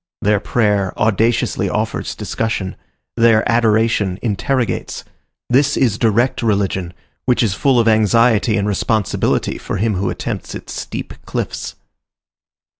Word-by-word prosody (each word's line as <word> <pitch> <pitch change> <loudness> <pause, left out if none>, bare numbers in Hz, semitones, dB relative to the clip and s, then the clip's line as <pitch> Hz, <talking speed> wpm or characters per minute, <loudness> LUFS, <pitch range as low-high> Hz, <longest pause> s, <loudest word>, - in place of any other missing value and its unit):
Their 105 0 +3
prayer 105 -4 0
audaciously 110 +2 +1
offers - - -2
discussion. 110 -4 -3 0.4
Their 115 -2 +4
adoration 110 -4 +2
interrogates. 120 +3 -1 0.4
This 140 +3 +2
is 115 -6 +1
direct 115 +3 +2
religion, 100 -5 0 0.3
which 125 -2 +2
is 105 -5 +1
full 130 +5 +2
of 115 - +2
anxiety 110 0 +3
and 100 0 0
responsibility 105 0 0
for - - -4
him 110 +2 0
who 95 +1 -1
attempts - - -5
its - - -8
steep - - -6
cliffs. - - -4
110 Hz, 120 wpm, -18 LUFS, 100-115 Hz, 0.4 s, Their